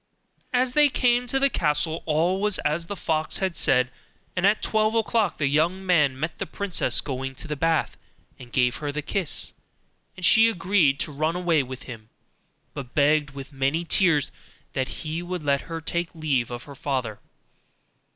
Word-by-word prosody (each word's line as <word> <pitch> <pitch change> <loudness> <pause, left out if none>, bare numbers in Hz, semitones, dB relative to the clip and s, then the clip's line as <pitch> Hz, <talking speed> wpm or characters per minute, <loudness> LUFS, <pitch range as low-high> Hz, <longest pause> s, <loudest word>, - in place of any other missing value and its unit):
As 250 0 +1
they 295 0 +5
came 245 -1 +1
to 270 - +1
the 275 0 +3
castle, 155 -1 0
all 170 +5 +1
was 210 -2 +3
as 155 +3 0
the 205 - -4
fox 160 -4 -1
had 190 -3 -1
said, 125 -1 +2 0.4
and 185 +1 +3
at 210 +2 +1
twelve 215 0 +1
o'clock 225 -3 +1
the 150 - 0
young 165 +7 +1
man 150 -8 +2
met 160 +3 -4
the - - -3
princess 200 -4 +1
going 135 -1 -5
to 150 - -7
the 150 - -3
bath 165 +1 0 0.4
and 120 -2 -12
gave 125 -1 +1
her 145 -1 -4
the 150 +1 -4
kiss, 170 -3 -3 0.6
and 185 - -1
she 225 +4 +7
agreed 175 -8 +2
to 155 - -2
run 155 +4 -1
away 175 -4 +2
with 130 -1 -8
him, 110 -3 -10 0.6
but 130 -3 -8
begged 145 -1 +2
with 140 +1 -9
many 135 +5 0
tears 165 -6 +3 0.4
that 130 -1 -1
he 160 +3 -5
would 175 -2 -5
let 140 -1 +1
her 165 -1 -6
take 170 +1 -3
leave 140 -7 0
of 120 0 -6
her 145 - -11
father. 130 -6 -3
155 Hz, 180 wpm, -25 LUFS, 140-185 Hz, 0.6 s, she